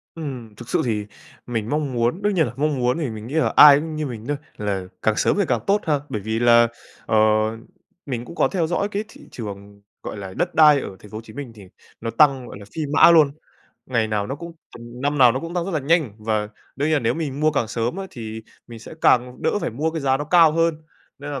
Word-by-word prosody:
Ừm, 125 -9 -7
thực 120 +1 -12
sự - - +1
thì 105 -3 -1 0.4
mình 115 -2 -3
mong 145 -3 -1
muốn 120 +10 0
đương 205 0 +1
nhiên 160 -4 +3
là 120 - -6
mong 150 -1 0
muốn 125 +4 +1
thì 150 -7 -2
mình 110 0 -8
nghĩ 140 - -8
là 160 - +1
ai 145 -1 +9
cũng 155 0 -5
như 155 -1 -2
mình 115 -4 -7
thôi, 145 -1 -1 0.2
là 100 -3 -2 0.2
càng 110 -1 +1
sớm - - +1
thì 200 - +3
càng 120 -3 +1
tốt 205 +1 +3
ha! 150 -3 +1
Bởi 105 - -4
vì 110 +2 -2
là, 120 -1 +5 0.4
ờ, 110 - +1 0.9
mình 125 -3 -4
cũng 170 - -11
có - - +3
theo 170 -5 -1
dõi 190 +4 -1
cái 205 +2 -2
thị - - -16
trường, 100 -2 -9 0.2
gọi - - -6
là, 95 -1 -7
đất 175 0 -1
đai 150 -3 +6
ở 95 - -7
Thành 105 - -15
phố 110 - -6
Hồ - - -6
Chí 110 -1 -14
Minh 135 -3 -7
thì 100 - -13 0.4
nó 115 - -3
tăng, 135 -5 +3
gọi 100 - -10
là, 100 - -11
phi 160 - -3
mã 170 - +7
luôn. 155 -4 +5 0.6
Ngày 115 -4 0
nào 105 -1 -1
nó 135 - -4
cũng 170 +3 -9 0.3
năm 125 +5 -4
nào 125 -3 +7
nó 130 - -3
cũng 165 +1 -7
tăng 175 -1 -1
rất 195 - -4
là 155 -4 -1
nhanh, 150 - +1
và 105 -1 -1 0.3
đương 145 +3 0
nhiên - - +1
là - - 0
nếu 120 +1 0
mình 145 -3 -4
mua 155 - +3
càng 115 -6 -1
sớm 120 +8 -2
á 195 0 -5
thì 110 -1 -7 0.2
mình 115 -1 -10
sẽ 115 - -11
càng 125 0 +2
đỡ 210 - +1
phải - - -3
mua 150 +8 -2
cái 160 - -4
giá 135 -1 +2
nó 145 - -4
cao 165 -1 +5
hơn. 165 0 +2 0.4
Nên 145 +1 -7
là, 140 -2 -4
130 Hz, 265 wpm, -22 LUFS, 115-155 Hz, 0.9 s, ai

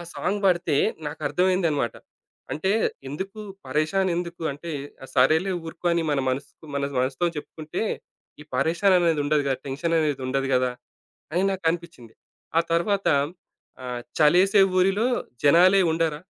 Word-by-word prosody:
Song 200 +3 -1
బాడితే 175 -5 +2 0.3
నాకర్థమైందన్నమాట. 165 - 0 0.6
అంటే 190 +6 -1 0.4
ఎందుకు, 190 +9 -6 0.3
పరేషాన్ 155 +7 +1
ఎందుకు, 170 -1 -5
అంటే 165 +4 -8 0.4
సరేలే 160 +9 +3
ఊరుకో 170 +2 -7
అని 170 -1 +1 0.3
మనసుకు 140 +4 -6
మన 140 0 0 0.2
మనసుతో 130 +7 0
చెప్పుకుంటే 155 +4 -5 0.6
ఈ - - -8
పరేషాననేది 170 +2 +3
ఉండదుగా. 145 -2 +1
టెన్షన్ 145 +5 -1
అనేది 145 -4 0
ఉండదు 135 0 -1
గదా! 125 0 +2 0.6
అని 180 +3 +1
నాకనిపించింది. 170 - -3 0.4
ఆ - - +6
తరువాత 195 +4 +1 0.8
ఆహ్, 125 -1 -4 0.2
చలేసే 185 +7 +5 0.2
ఊరిలో 195 +5 +3 0.4
జనాలే 180 +6 +6
ఉండరా, 160 -2 0
165 Hz, 115 wpm, -25 LUFS, 145-185 Hz, 0.8 s, ఆ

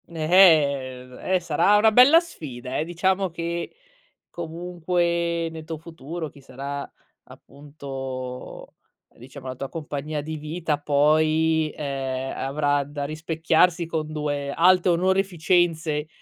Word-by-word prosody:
Ehm, 145 -7 +3
è 185 0 0
sarà 170 +4 +3
una 220 +1 +5
bella 255 +8 +8
sfida, 130 - -7
eh. 155 - -1
Diciamo 190 +2 0
che 170 - -4 0.6
comunque 170 0 -2
nel 160 -1 -9
tuo 160 0 -6
futuro 160 0 -7
chi 140 - -17
sarà 140 +2 -6 0.3
appunto 135 -3 -8 0.4
diciamo 130 +2 -12
la 130 - -4
tua 135 +2 -5
compagnia 150 -1 -5
di 155 +1 -5
vita 155 0 -3
poi, 155 +2 +2
ehm, 135 -2 -3
avrà 145 +1 0
da 145 0 -5
rispecchiarsi 160 +3 +1
con 160 -2 -3
2 145 -2 -3
alte 180 +4 +4
onoreficenze, 175 -4 +1
155 Hz, 115 wpm, -24 LUFS, 140-170 Hz, 0.6 s, bella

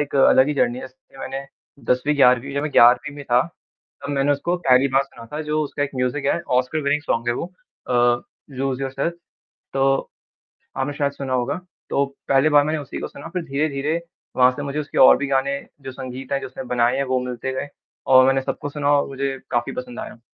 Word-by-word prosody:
एक 145 -1 -3
अलग 130 +1 +5
ही 150 - 0
जर्नी 125 -2 +1
है - - -7
इसके 130 +1 -16
मैंने 135 +1 -5 0.4
10वीं 130 +4 +2
11वीं 130 0 +4
जब 140 - 0
मैं 150 - -2
1वीं 125 +5 +5
में 145 - -8
था। 120 -1 +3 0.6
तब 145 - -3
मैंने 140 0 +2
उसको 170 +5 -1
पहली 135 -5 +4
बार 135 - +5
सुना 120 -4 -13
था 150 - -3
जो 155 0 -1
उसका 145 0 -3
एक 145 - -1
म्यूजिक 125 +3 -1
है 170 - +1 0.2
ओस्कार 130 +5 0
विनिंग 140 +2 +1
सोंग 115 -5 -1
है 120 - +1
वो 165 - -3 0.4
अ, - - -1 0.6
लूज़ 135 0 -2
योरसेल्फ 135 +5 -2 0.6
तो 135 0 +2 0.9
आपने 135 +2 -1
शायद 140 -1 +1
सुना 135 -2 -5
होगा। 130 +7 -1 0.3
तो 140 - +2 0.2
पहली 135 +2 +4
बार 145 -1 +5
मैंने 155 +1 -1
उसी 140 - -7
को - - -4
सुना - - -10
फिर 180 - -1
धीरे-धीरे 150 +2 -1 0.4
वहाँ 125 0 +6
से 145 - -4
मुझे 145 +1 -4
उसके 150 - -4
और 130 - +8
भी 140 - -2
गाने 140 +1 0 0.2
जो 135 - -7
संगीत 130 0 -7
है, 140 - +1
जो - - -5
उसने 130 - -8
बनाए 120 -1 +1
हैं 140 - 0
वो 130 -1 0
मिलते 125 +1 -4
गए 130 +2 -4 0.4
और 130 -1 +7
मैंने 135 0 +3
सबको 145 +2 -4
सुना 145 0 0
और 145 -1 +2
मुझे 135 0 -3
काफ़ी 120 0 -1
पसंद 250 -3 -6
आया। 165 - -9
135 Hz, 220 wpm, -22 LUFS, 130-145 Hz, 0.9 s, और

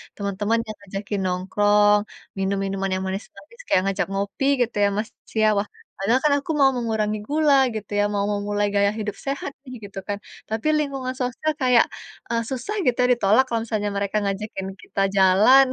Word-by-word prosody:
teman-teman 205 +2 -1
yang 215 - -6
ngajakin 200 +1 -5
nongkrong, 205 +3 +3 0.4
minum-minuman 195 0 -1
yang 185 - -3
manis-manis 195 - -8
kayak 185 - +3
ngajak 195 - -1
ngopi 200 +7 -1 0.2
gitu 235 - -6
ya - - +5
Mas 215 +2 -2 0.3
ya. 215 - +5
Wah, 205 - -2 0.3
padahal 225 +7 +2
kan 300 -1 +4
aku 285 - -4
mau 270 -1 +6
mengurangi 220 -3 -1
gula 300 -1 +3 0.2
gitu 215 -2 -6
ya, - - +4
mau 200 0 0
memulai 205 0 0
gaya 200 0 +3
hidup 210 -1 -3
sehat 275 0 -2 0.2
nih 255 - -9 0.2
gitu 195 - -7
kan. 205 - -2 0.3
Tapi 220 +6 -2
lingkungan 270 -3 -2
sosial 250 +5 -1
kayak, 250 -2 +5 0.4
e - - -2 0.2
susah 265 - -4
gitu 250 -2 +2
ya - - +4
ditolak 220 +4 +4
kalau 230 - 0
misalnya 215 -2 -1
mereka 200 +1 -1
ngajakin 200 0 -3
kita 195 - -3
jalan. 200 +8 +6
210 Hz, 175 wpm, -23 LUFS, 200-250 Hz, 0.4 s, mau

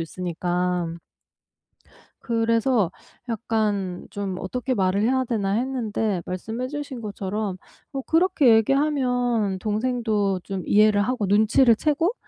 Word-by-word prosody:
있으니까. 175 0 -2 1.3
그래서 230 -4 +1 0.4
약간 210 -5 -1
좀 195 -2 -4
'어떻게 250 +6 -2
말을 190 -1 +1
해야 260 +2 +2
되나.' 205 -5 -1
했는데 225 -5 -1
말씀해 220 +7 -4
주신 285 -3 -6
것처럼 205 -1 -4 0.3
뭐 275 - -3
그렇게 325 -8 +4
얘기하면 245 -5 +1
동생도 215 -3 0
좀 195 -2 -4
이해를 210 0 +4
하고 220 0 -1
눈치를 220 +5 +4
채고 310 - +1
220 Hz, 255 characters per minute, -24 LUFS, 195-250 Hz, 1.3 s, 그렇게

